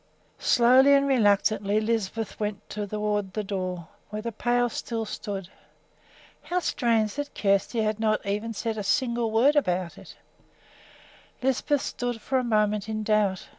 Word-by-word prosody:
Slowly 260 +3 +5
and 275 0 +3
reluctantly 210 -4 +2
Lisbeth 220 -1 -2
went 210 -1 -4
toward 210 -1 -2
the 215 - -1
door, 185 -4 -4 0.2
where 215 0 -5
the 235 - -3
pail 245 +2 +1
still 230 -1 -4
stood. 200 -3 -6 0.9
How 360 - -3
strange 230 - +1
that 290 0 -5
Kjersti 200 +3 +1
had 215 0 -1
not 215 -1 0
even 205 +3 -2
yet 225 - -6
said 225 +1 -3
a - - -3
single 235 0 0
word 240 +7 +3
about 180 -10 0
it! - - -13 1.3
Lisbeth 265 +2 +1
stood 245 -2 -3
for 260 +4 0
a - - -2
moment 210 -2 +1
in 215 0 -2
doubt. 210 -3 +1
215 Hz, 150 wpm, -26 LUFS, 205-240 Hz, 1.3 s, Slowly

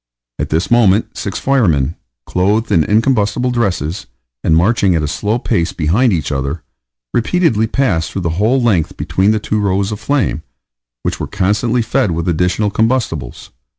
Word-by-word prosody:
At - - -2
this 80 +8 -1
moment 115 -3 +3
six 100 - -4
firemen, 85 - +1 0.3
clothed 105 +5 0
in 85 - +4
the 75 - -2
incombustible 115 +1 +2
dresses, 95 - -2 0.4
and 80 - +3
marching 95 0 +2
at 80 - 0
a - - -1
slow 105 +9 -1
pace 85 -8 -1
behind 100 +11 +2
each 80 -6 -1
other, 70 +3 -3 0.5
repeatedly 120 - +1
passed 105 -11 0
through 95 - -4
the 85 -1 -2
whole 120 +5 +3
length 100 -10 0
between 80 +6 +1
the 110 - +3
two 105 0 -2
rows 100 0 0
of 105 - -5
flame, 130 - 0 0.6
which - - -2
were - - -3
constantly 105 +5 0
fed 120 0 0
with 85 0 -2
additional 90 +5 +1
combustibles. 110 - -1
100 Hz, 165 wpm, -16 LUFS, 85-115 Hz, 0.6 s, in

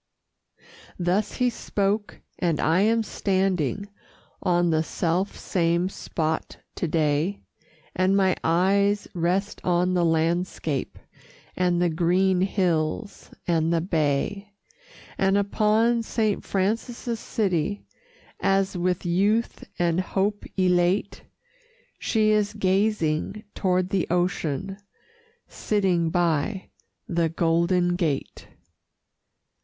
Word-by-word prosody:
Thus 180 +4 0
he 250 -1 +1
spoke, 205 -2 -2 0.2
and 170 -4 0
I 165 +4 +3
am 225 +2 +3
standing 190 - -1 0.5
On 175 -1 +2
the 160 0 +2
self 175 +4 -1
same 170 0 0
spot 160 -4 -3 0.2
to 175 - -1
day, 155 +4 0 0.5
And 185 +2 +2
my 190 -2 +3
eyes 200 +4 +2
rest 180 +3 -1
on 180 +1 +2
the 180 -1 +2
landscape, 165 -3 -1 0.6
And 180 -1 +1
the 175 -1 +2
green 180 +3 +2
hills, 185 0 -1 0.2
and 165 -2 +1
the 170 - +2
bay, 170 +5 -1 0.6
And 195 +1 +3
upon 215 +3 +2
Saint 215 -2 -1
Francis' 225 +4 -2
city, 200 -2 -1 0.5
As, 195 0 +1
with 180 +1 -1
youth 200 +7 +1
and 170 0 +1
hope 200 +2 -1
elate, 180 +1 +1 0.7
She 215 -1 +2
is 210 0 +1
gazing 195 -1 0
toward 185 -1 0
the 190 -4 0
ocean, 180 +1 -1 0.7
Sitting 185 -5 0
by 175 +3 0 0.4
the 170 -1 +1
Golden 170 +2 +1
Gate. 160 -6 -2
185 Hz, 100 wpm, -25 LUFS, 170-200 Hz, 0.7 s, I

